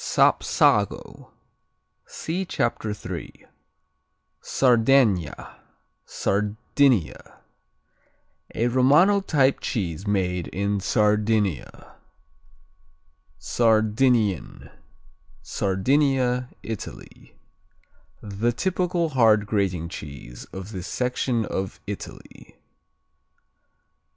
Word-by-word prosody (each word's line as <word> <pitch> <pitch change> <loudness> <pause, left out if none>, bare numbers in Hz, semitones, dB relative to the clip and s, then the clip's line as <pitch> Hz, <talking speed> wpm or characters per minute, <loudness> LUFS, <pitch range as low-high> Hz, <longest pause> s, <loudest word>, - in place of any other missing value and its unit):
Sapsago - - +1 0.8
see 175 +4 -4
Chapter 115 - -2
3. 105 - -8 1.0
Sardegna 115 - +2 0.5
Sardinia 105 - 0 1.2
A 115 - +1
Romano 145 +11 +4
type 140 -7 +1 0.4
made 90 -4 -1
in 100 +1 -2
Sardinia. 105 - 0 1.4
Sardinian 110 - +1 0.7
Sardinia, 125 - 0
Italy 110 -3 -9 0.9
The 105 +3 -1
typical 180 +3 -1
hard 110 -6 +4
grating 95 -5 -1
cheese 70 -6 -9
of 95 +2 -9
this 95 -3 -6
section 125 -2 -1
of 95 0 -4
Italy. 100 -1 -9
110 Hz, 60 wpm, -24 LUFS, 95-130 Hz, 1.4 s, Romano